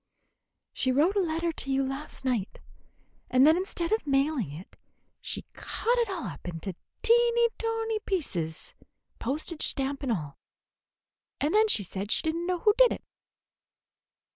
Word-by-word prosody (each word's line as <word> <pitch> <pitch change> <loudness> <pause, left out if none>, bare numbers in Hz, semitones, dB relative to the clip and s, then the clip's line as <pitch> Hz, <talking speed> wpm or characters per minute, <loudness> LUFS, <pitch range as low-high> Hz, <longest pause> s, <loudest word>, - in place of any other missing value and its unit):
"She 260 - +1
wrote 310 +10 +3
a - - +3
letter 335 -1 0
to 275 - -4
you 270 0 +2
last 270 +1 -5
night, 235 -7 -1 0.7
and 255 +2 +5
then 315 +2 +7
instead 350 -2 -2
of 440 -8 0
mailing 275 - +1
it 160 +6 -10 0.5
she - - -4
cut 480 +2 -1
it 465 -3 +1
all 365 -9 -4
up 175 -2 -7
into 175 +2 -5 0.3
teenty 470 0 +5
tonty 450 -1 -1
pieces, 175 - -3 0.5
postage 305 +6 -2
stamp 275 +1 -2
and 270 -4 -1
all; 150 -9 -3 1.0
and 295 +3 0
then 435 +1 +5
said 200 - 0
she - - +4
did 320 0 0
n't 340 +1 -3
know 365 -1 +1
who 420 +4 +4
did - - +7
it." - - -8
305 Hz, 155 wpm, -28 LUFS, 250-390 Hz, 1.0 s, then